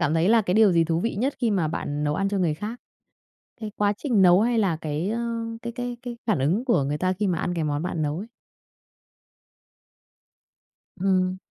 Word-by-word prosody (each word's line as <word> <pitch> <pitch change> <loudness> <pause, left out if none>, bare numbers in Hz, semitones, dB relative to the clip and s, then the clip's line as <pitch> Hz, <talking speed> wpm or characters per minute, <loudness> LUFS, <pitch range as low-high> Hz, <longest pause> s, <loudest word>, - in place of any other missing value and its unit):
cảm 150 +2 +1
thấy 165 +4 +2
là 230 -1 +5
cái 180 -2 -1
điều 215 -3 +5
gì 165 -1 +3
thú 165 0 0
vị 230 +5 -1
nhất 260 +8 -1
khi 235 -3 +1
mà 180 -7 +1
bạn 145 -1 -3
nấu 150 0 0
ăn 195 +3 0
cho 200 - -1
người 170 -5 +1
khác? 215 +9 -6 0.8
Cái 215 -1 -5
quá 205 0 +1
trình 235 -8 +1
nấu 180 +1 +6
hay 235 +1 +1
là 190 -6 +1
cái, 155 +4 -3
ơ, 230 +2 -2 0.4
cái 235 0 -5
cái 245 -1 -4
cái 240 -1 -7
phản 215 - +1
ứng 180 - +1
của 230 - +2
người 145 +2 -2
ta 185 +3 0
khi 205 +2 -1
mà 175 -3 0
ăn 175 - -1
cái 165 - -2
món 150 +1 -1
bạn 170 -3 -2
nấu 150 +1 -1
ấy? 210 +4 -6 2.7
Ừm. 185 -1 +1
185 Hz, 220 wpm, -25 LUFS, 165-220 Hz, 2.7 s, nấu